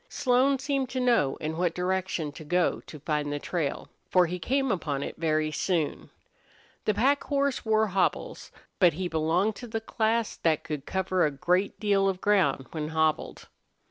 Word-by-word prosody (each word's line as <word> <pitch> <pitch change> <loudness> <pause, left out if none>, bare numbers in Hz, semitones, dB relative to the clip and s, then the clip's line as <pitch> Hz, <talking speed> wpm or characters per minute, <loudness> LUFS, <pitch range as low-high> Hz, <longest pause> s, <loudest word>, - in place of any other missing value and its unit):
Slone 260 +1 +2
seemed 270 -1 -1
to 260 - -3
know 235 - +2
in 155 +1 -4
what 175 -1 0
direction 180 -4 -1
to 155 - -10
go 175 +3 +1
to 150 - -9
find 150 -1 -1
the 145 - -1
trail, 150 -1 -3 0.2
for 180 -1 +5
he 180 +2 -4
came 270 +8 0
upon 145 -6 -2
it - - -6
very 155 -1 0
soon. 160 0 -1 0.8
The 215 - +1
pack 275 +7 +2
horse 280 -2 0
wore 220 -1 +3
hobbles, 195 -2 -1 0.3
but 180 -4 +5
he 180 +3 -3
belonged 170 +6 +1
to 245 - -8
the 225 0 -3
class 225 0 -1
that 155 -2 +1
could 150 -4 -5
cover 185 -1 0
a 150 - +3
great 180 +7 0
deal 200 -2 +2
of 185 -1 -3
ground 185 -11 +2
when 155 -2 -3
hobbled. 160 -1 -1
180 Hz, 175 wpm, -27 LUFS, 155-220 Hz, 0.8 s, for